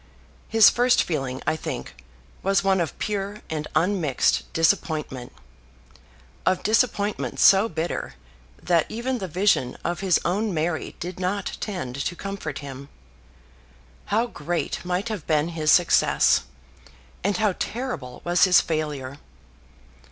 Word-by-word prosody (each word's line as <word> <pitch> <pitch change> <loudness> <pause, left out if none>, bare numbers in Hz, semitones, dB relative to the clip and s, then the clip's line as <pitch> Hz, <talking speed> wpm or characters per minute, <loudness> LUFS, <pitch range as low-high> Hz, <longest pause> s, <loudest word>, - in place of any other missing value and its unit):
His 225 -2 +7
first 245 +1 +3
feeling, 135 -5 -3
I - - +1
think, 160 - -7 0.4
was 195 +1 +2
one 190 -2 +3
of 165 - -3
pure 205 0 -3
and 150 -1 -3
unmixed 170 -7 +1
disappointment; 150 -5 0 1.1
of 185 - +1
disappointment 210 -1 0
so 195 +3 +6
bitter, 165 +2 -3 0.5
that 170 -3 +2
even 245 +3 -2
the 190 - -4
vision 175 -7 +1
of 175 0 -2
his 190 -3 +2
own 200 +2 0
Mary 160 +1 -2
did 180 +1 -6
not 185 +2 -2
tend 140 - -4
to 175 - -3
comfort 195 -7 -5
him. 140 +1 -9 1.2
How 220 +3 +1
great 170 -8 -3
might 180 +5 -2
have 210 -8 -5
been 155 0 +2
his 155 -2 +1
success, 175 - +4 0.8
and 200 +1 +1
how 215 -3 +2
terrible 225 - -4
was 175 +2 +4
his 180 -2 +6
failure! 145 -4 -3
175 Hz, 130 wpm, -24 LUFS, 155-200 Hz, 1.2 s, His